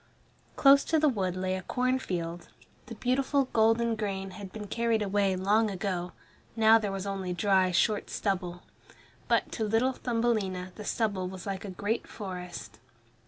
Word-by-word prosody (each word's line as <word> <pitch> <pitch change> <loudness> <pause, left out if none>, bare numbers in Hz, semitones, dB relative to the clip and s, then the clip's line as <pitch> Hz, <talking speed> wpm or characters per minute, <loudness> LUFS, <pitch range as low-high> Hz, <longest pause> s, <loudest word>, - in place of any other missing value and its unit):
Close 280 0 +6
to 320 - +1
the 310 0 +4
wood 190 -9 0
lay 185 0 -1
a 185 - -4
corn 255 +7 0
field. 170 -5 -4 0.4
The - - -7
beautiful 265 +1 +1
golden 225 +1 +3
grain 195 -3 -3
had 195 -1 -9
been 210 0 -7
carried 230 +1 0
away 200 -1 +1
long 210 +4 +2
ago, 180 -2 -3 0.4
now 225 0 +6
there 210 -2 -2
was 195 0 -4
only 195 -2 -3
dry 190 +1 +3
short 205 +4 +1
stubble. 180 -3 -2 0.6
But - - +1
to 225 - -2
little 225 +5 +2
Thumbelina 215 -7 -1
the 210 - -9
stubble 200 -6 -1
was 185 -1 -8
like 195 0 -4
a - - -5
great 205 +5 -2
forest. 180 - -7
205 Hz, 165 wpm, -29 LUFS, 185-225 Hz, 0.6 s, Close